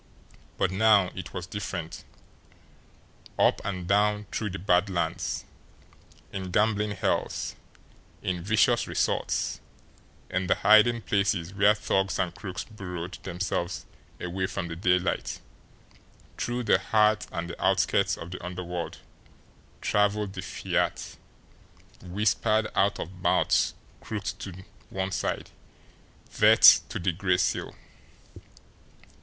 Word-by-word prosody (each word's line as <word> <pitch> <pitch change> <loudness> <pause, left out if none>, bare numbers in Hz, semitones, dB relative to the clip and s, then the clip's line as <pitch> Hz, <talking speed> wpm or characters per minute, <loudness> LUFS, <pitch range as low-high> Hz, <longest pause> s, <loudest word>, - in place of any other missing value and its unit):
But 95 - +1
now 100 -1 +4
it 95 -3 -7
was 90 - -5
different. 90 -4 -6 1.3
Up - - +3
and 90 -3 -4
down 105 +1 +2
through 105 - -2
the 95 - -5
Bad 90 +1 +2
Lands, 85 -3 -2 0.9
in 95 -1 -4
gambling 105 +2 +1
hells, - - -1 0.7
in 90 -1 -2
vicious 110 +5 +2
resorts, - - -1 0.7
in 95 +1 -2
the - - +3
hiding 110 +2 +5
places 100 -3 0
where 100 +2 +4
thugs 95 -2 0
and 85 -2 -1
crooks 95 -1 -6
burrowed 90 -4 -7
themselves 90 -1 -3 0.3
away 95 +1 -2
from 85 - -4
the 80 - -5
daylight, 90 +1 0 1.0
through 120 +1 -2
the - - +4
heart 105 -1 +2
and 85 0 -4
the - - -8
outskirts - - +2
of 85 - -8
the 90 - -7
underworld 90 -1 -5 0.8
travelled 105 -1 +1
the - - -5
fiat, - - -2 0.9
whispered 110 +3 +1
out 100 +2 +2
of 90 +1 -7
mouths - - +2 0.2
crooked 105 -2 -5
to 95 -1 -8 0.3
one 95 0 -3
side 95 - -3 0.8
DEATH - - +8
TO - - -4
THE 90 +1 0
GRAY 90 +1 +1
SEAL! 90 - -1
95 Hz, 115 wpm, -27 LUFS, 90-105 Hz, 1.3 s, DEATH